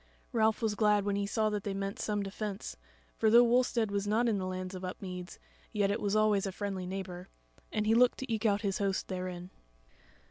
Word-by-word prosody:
Ralph 220 -1 +2
was 220 -2 +2
glad 210 -1 +3
when 200 -1 0
he 200 0 -1
saw 215 +1 +1
that 205 -1 -2
they 200 -2 -3
meant 195 0 -3
some 205 -1 -1
defence; 200 0 -5 0.4
for 220 - +4
though 235 +2 +8
Wulstead 240 -2 +2
was 200 0 -1
not 225 +4 +2
in 215 -4 +1
the 185 - -3
lands 185 0 -4
of 185 0 -7
Upmeads, 180 -1 -6 0.3
yet 205 -2 +1
it 210 - -2
was 205 0 0
always 210 -2 +3
a - - -3
friendly 190 -1 -4
neighbour, 185 -1 -6 0.4
and 215 -1 0
he 220 - +4
looked 245 +2 +5
to 260 -3 -3
eke 220 +1 +1
out 205 -1 +2
his 195 -2 -1
host 195 -1 -1
therein. 180 -1 -5
205 Hz, 215 wpm, -31 LUFS, 190-215 Hz, 0.4 s, though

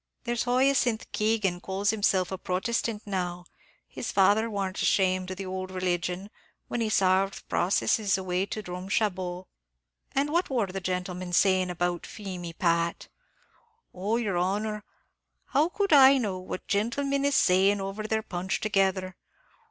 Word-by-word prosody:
There's 240 -1 -1
Hyacinth 250 -2 +2
Keegan 210 -5 0
calls 195 +2 0
himself 195 -4 +1
a 190 - -3
Protestant 215 +3 -2
now; 180 -3 -3 0.4
his - - -5
father 205 +4 +3
warn't 195 -3 -3
ashamed 185 -1 +2
of 185 - -5
the 195 - -5
ould 185 0 -4
religion, 185 +1 -2 0.4
when 240 - -2
he 220 - 0
sarved 195 -1 +1
processes 195 +2 +1
away 185 0 -1
to 215 - -5
Drumshambo." 185 0 -2 0.7
"And 280 +2 +1
what 345 +3 +1
wor 245 -6 +1
the 190 0 -6
gentlemen 180 0 -3
saying 185 0 +3
about 175 0 -2
Feemy, 180 -5 -7
Pat?" 170 0 0 0.8
"Oh, 200 +5 -1
yer 205 -7 -1
honor, 210 +4 -1 0.7
how 300 +5 +2
could 400 -2 0
I 275 -1 +8
know 200 -7 -2
what 185 0 -7
gentlemin 275 +7 0
is 285 -1 +2
saying 195 +1 +4
over 195 +2 -4
their 220 0 0
punch, 180 0 -3
together? 190 -3 0
195 Hz, 145 wpm, -27 LUFS, 185-220 Hz, 0.8 s, I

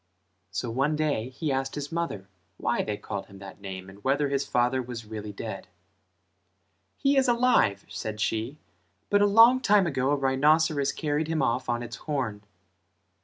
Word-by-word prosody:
So 100 +5 -3
one 135 +6 +1
day 145 -6 -1
he 145 +3 -3
asked 135 0 -2
his 145 0 -5
mother 165 - -3 0.3
why - - 0
they 105 -1 -3
called 100 -1 -6
him 100 - -14
that 100 +1 -11
name 95 -1 -7
and 100 +1 -14
whether 140 +2 +1
his 140 0 -1
father 125 +2 +1
was 120 -2 -7
really 105 -1 -6
dead. 100 - -7 1.3
"He 275 0 +2
is 265 -1 +4
alive" 240 - +3
said 110 -1 -5
she 115 +6 -1 0.5
"but 205 - +4
a 205 - +5
long 230 +5 +7
time 205 -6 +4
ago 135 -5 0
a 145 - +3
rhinoceros 145 +2 +2
carried 150 0 -1
him 160 -1 0
off 120 +2 0
on 120 0 0
its 120 0 -7
horn." 130 -9 -3
135 Hz, 170 wpm, -27 LUFS, 110-155 Hz, 1.3 s, long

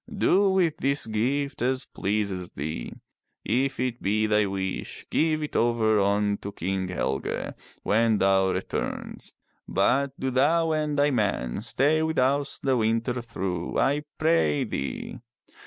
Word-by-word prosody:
" 235 - -20
Do 195 +1 +4
with 185 -5 +2
this 140 +1 +1
gift 130 +6 -1
as 130 +1 0
pleases 100 -3 -2
thee. 70 -3 -4 0.5
If 135 +4 0
it 125 -1 -2
be 110 +2 +1
thy 105 -1 +2
wish, 95 -1 -4
give 155 -1 +1
it 150 - -6
over 115 -2 +3
unto 100 0 0
King 95 +1 -2
Helge 70 -7 -2 0.3
when 110 +1 +3
thou 95 -1 +3
retumest, - - -4 0.3
but 135 +8 +1
do 130 - -1
thou 160 +6 +3
and 150 -2 0
thy 145 +1 +3
men 100 - -1
stay 145 +7 +2
with 160 0 -1
us 140 +2 +1
the 135 -2 +1
winter 115 +2 0
through, 95 -7 -4
I 145 +2 +2 0.2
pray 160 -3 +2
thee.'' 70 - -4
120 Hz, 140 wpm, -26 LUFS, 100-140 Hz, 0.5 s, Do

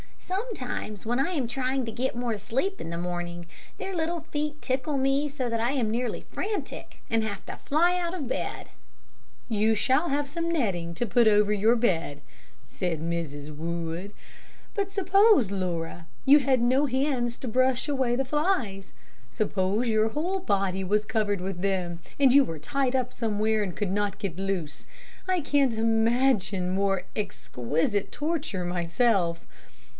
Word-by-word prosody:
Sometimes 365 - -4
when 240 +3 0
I 280 +7 +1
am 290 -8 0
trying 255 +1 -1
to 225 - -4
get 250 +3 -2
more 240 -2 -1
sleep 270 - -2
in - - -5
the 170 - -3
morning, 175 0 -4 0.3
their 385 - -4
little 335 0 -1
feet 300 0 -2
tickle 265 +3 -1
me 270 +2 +2
so 270 -4 -3
that 230 0 -1
I 235 +3 +1
am 245 -6 0
nearly 245 +2 -1
frantic 420 +1 -4
and 225 -1 +2
have 205 -3 -4
to - - -7
fly 345 +5 +3
out 345 0 -2
of 315 -8 -4
bed." - - -3 0.8
"You 220 0 +2
shall 265 +9 +2
have 285 0 0
some 335 +3 -2
netting 190 - 0
to 240 - 0
put 235 +1 +4
over 210 -1 +4
your 215 +3 +4
bed," 165 -11 0 0.5
said 175 -4 -2
Mrs. 155 -3 -4
Wood; 170 +4 -4 0.6
"but 400 -2 -1
suppose, 390 - +4
Laura, 175 -3 -3 0.2
you 285 +2 +8
had 265 -3 +2
no 260 +4 +3
hands 255 -3 0
to 260 - -5
brush 255 +3 +2
away 260 -4 +1
the 270 +2 0
flies. 255 - -1 0.4
Suppose 205 - 0
your 220 0 +3
whole 345 +10 -1
body 195 - 0
was 210 +3 +1
covered 210 -3 0
with 185 -1 -4
them, 180 -3 -1 0.2
and 270 -2 +6
you 280 0 +8
were 165 - -5
tied 265 - -1
up 250 -1 0
somewhere 220 -1 0
and 190 -4 -3
could 205 -3 -1
not 205 0 0
get 195 -5 -4
loose. 180 -7 -3 0.4
I 370 -2 +2
can't 275 -5 +2
imagine 225 -4 +2
more 195 -1 +1
exquisite 185 - -1
torture 295 - -2
myself. 175 0 +1
225 Hz, 160 wpm, -27 LUFS, 190-275 Hz, 0.8 s, you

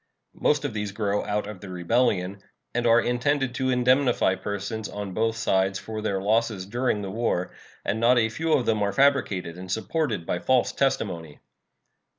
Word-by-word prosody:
Most 150 -1 +2
of 135 - -2
these 105 -1 -3
grow 105 -1 0
out 105 0 -1
of 105 -3 -8
the 100 - -9
rebellion, 95 +1 0 0.3
and 120 0 +1
are 115 0 +6
intended 130 +2 0
to 130 0 -1
indemnify 125 -4 +3
persons 100 +3 -4
on 100 -2 -5
both 115 +2 0
sides 95 -3 +1
for 110 +2 -6
their 100 -3 -1
losses 110 -1 0
during 120 0 -1
the 95 - -5
war; 110 -5 -1 0.3
and 110 - -1
not 120 +2 +4
a 110 -2 +3
few 160 +8 -2
of 125 - +2
them 110 -2 +1
are 100 0 0
fabricated 100 -11 +1
and 95 0 -7
supported 110 - -1
by 90 - -1
false 130 +3 +2
testimony. 100 - -1
110 Hz, 175 wpm, -25 LUFS, 100-125 Hz, 0.3 s, are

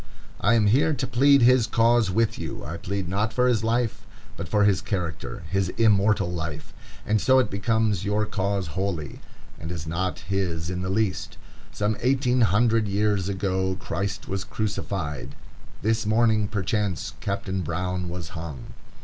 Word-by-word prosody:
I 115 +4 +3
am 110 -2 +3
here 145 +9 +3
to 130 - -2
plead 135 +2 +4
his 125 -2 +5
cause 115 -2 +3
with 110 +4 +1
you. - - -6
I 80 +4 -5
plead 100 0 -3
not 105 +5 0
for 125 +2 +2
his 115 -3 +2
life, 115 0 0 0.3
but - - -6
for 105 -1 +3
his 100 -3 +3
character,—his 90 -1 -3
immortal 105 -4 +3
life; 80 -3 -5 0.3
and 110 -1 +1
so 130 0 +4
it 130 - +2
becomes 105 -1 +1
your 105 +1 +1
cause 100 -3 -2
wholly, 85 -3 -3 0.4
and 80 +2 -6
is 85 -3 -5
not 90 +3 -2
his 90 -3 -2
in 90 0 -3
the 90 - -3
least. 100 -1 -1 0.3
Some 105 +1 -1
eighteen 130 0 +2
hundred 110 +1 +3
years 100 -1 0
ago 95 -1 -1
Christ 100 +1 -4
was 95 0 -2
crucified; 95 -10 -4 0.5
this 110 0 +1
morning, 110 -1 +3
perchance, 100 -2 -2
Captain 100 -3 -2
Brown 90 +2 -2
was 90 0 -6
hung. 80 -8 -8
100 Hz, 160 wpm, -25 LUFS, 90-110 Hz, 0.5 s, his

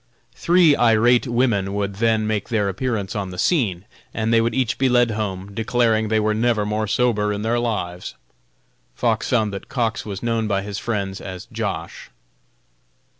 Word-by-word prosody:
Three 170 -4 +4
irate 120 +2 +4
women 115 -5 +1
would 100 -1 -2
then 110 -1 +2
make 105 -1 -2
their 110 -4 +1
appearance 105 0 -3
on 100 -2 -3
the 90 - -8
scene, 100 - 0 0.3
and 110 +1 0
they 115 - +5
would 115 0 -1
each 125 -4 0
be 135 -1 +3
led 120 -2 +3
home, 100 -2 -4
declaring 115 -1 +1
they 110 0 +2
were 110 0 +1
never 110 -1 +1
more 105 +1 -1
sober 105 -2 +1
in 105 0 -3
their 115 +2 +1
lives. 90 -7 -3 0.8
Fox 115 - 0
found 110 -5 +1
that 100 - -7
Cox 115 -4 -1
was 100 -1 -6
known 115 -2 0
by 100 -2 0
his 100 0 -5
friends 100 -4 -3
as 95 0 -7
Josh. 100 -7 -5
110 Hz, 175 wpm, -21 LUFS, 100-120 Hz, 0.8 s, they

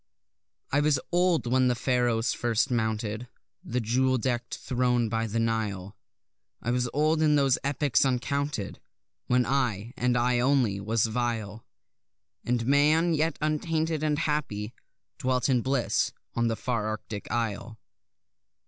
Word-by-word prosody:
I 145 - +3
was 145 -1 +2
old 175 -3 +2
when 130 +1 +3
the 125 - +2
Pharaohs 120 -2 +1
first 120 +3 0
mounted 110 0 -1 0.4
The 125 - -2
jewel 130 +3 +1
deck'd 120 0 -2
throne 125 -2 0
by 115 0 -1
the 110 +2 -3
Nile; 105 -4 -2 0.6
I 120 - -2
was 125 0 0
old 155 +2 +2
in 150 -1 +4
those 135 -3 +3
epochs 140 -4 +2
uncounted 135 -2 -2 0.5
When 125 0 +3
I, 120 -4 -1
and 125 0 +1
I 120 0 +2
only, 125 -6 +2
was 110 +3 +1
vile; 115 -2 -3 0.8
And 120 0 0
Man, 150 +5 +3
yet 160 +1 0
untainted 155 +1 0
and 150 -1 +1
happy, 140 -9 -2 0.5
dwelt 130 -1 +1
in 125 -2 +3
bliss 130 0 0 0.2
on 120 0 +1
the 115 - 0
far 115 -3 -2
Arctic 110 -1 -5
isle. 115 -1 -3
125 Hz, 140 wpm, -27 LUFS, 115-140 Hz, 0.8 s, in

